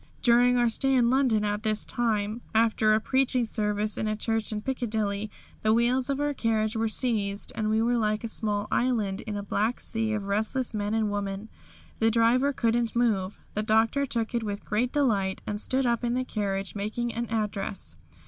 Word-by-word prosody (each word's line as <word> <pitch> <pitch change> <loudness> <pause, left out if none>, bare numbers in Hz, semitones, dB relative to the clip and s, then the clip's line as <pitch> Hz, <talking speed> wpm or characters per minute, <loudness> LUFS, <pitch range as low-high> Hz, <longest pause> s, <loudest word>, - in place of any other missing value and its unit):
During 245 0 +5
our 240 -1 +3
stay 270 +4 +1
in 240 -2 +4
London 250 -6 +2 0.2
this 215 -1 +2
time, 220 -1 -1
after 220 -1 +4
a - - +3
preaching 255 +1 +1
service 210 -1 -1
in 215 - -1
a 215 - 0
church 225 0 -1
in 210 -1 -3
Piccadilly, 215 -5 -2 0.3
the 215 0 +3
wheels 250 +2 +2
of 275 0 0
our 290 0 0
carriage 220 -3 0
were 225 0 +1
seized 210 -4 -1
and 215 -1 -1
we 220 +1 +2
were 240 +1 +2
like 215 -1 0
a - - -2
small 210 -2 -2
island 225 -5 0
in 210 -1 -3
a 205 - -4
black 215 +4 -1
sea 225 -1 -2
of 210 -1 -2
restless 220 +6 -1
men 210 0 -1
and 215 -2 +1
women. 200 +1 -4 0.5
The 225 - +4
driver 235 +5 +3
couldn't 235 -2 0
move. 210 -5 +1 0.2
The 210 - -1
Doctor 225 +6 +2
took 230 -2 -2
it 235 - 0
with 205 -2 -5
great 240 +4 0
delight 210 -10 +1
and 210 0 -3
stood 260 0 +1
up 235 0 +1
in 240 0 0
the 255 0 -1
carriage, 195 -5 -2
making 220 +4 -3
an 235 +1 -3
address. 200 - -3
220 Hz, 195 wpm, -27 LUFS, 210-240 Hz, 0.5 s, During